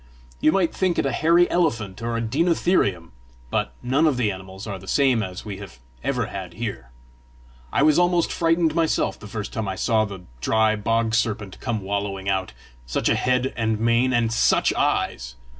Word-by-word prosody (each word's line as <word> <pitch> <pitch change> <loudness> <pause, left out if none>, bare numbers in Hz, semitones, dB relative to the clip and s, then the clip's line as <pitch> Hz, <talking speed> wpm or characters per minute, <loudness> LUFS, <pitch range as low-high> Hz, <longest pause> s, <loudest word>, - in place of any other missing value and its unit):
You 155 - +4
might 185 -2 +1
think 185 -2 0
it - - +1
a 135 - +1
hairy 170 +6 +4
elephant 115 - 0
or 115 0 -2
a - - -1
deinotherium 135 - +1 0.4
but - - -1
none 135 +6 +2
of 140 -5 +1
the 110 -4 +1
animals 95 +1 -9
are 100 -3 -5
the 95 - -14
same 130 -3 +3
as 95 -1 -6
we 100 -3 -5
have 100 -10 -10 0.3
ever 125 -3 0
had 95 -4 -7
here. 100 - -5 0.8
I - - +2
was 155 +2 +5
almost 175 -1 +2
frightened 165 -1 +2
myself 165 -1 0
the 105 - -10
first 105 0 -5
time 110 -2 -3
I 95 - -2
saw 110 +2 +2
the 100 -3 -8 0.2
dry 110 +6 +2
bog 115 +2 0
serpent 105 -3 -1
come 115 -4 -2
wallowing 100 0 -3
out 95 -1 0 0.4
such - - 0
a - - +3
head 125 +1 +1
and 110 -2 0
mane! 115 +3 +2
and 115 -2 +1
SUCH - - +3
eyes! 65 -1 -1
115 Hz, 190 wpm, -23 LUFS, 100-140 Hz, 0.8 s, was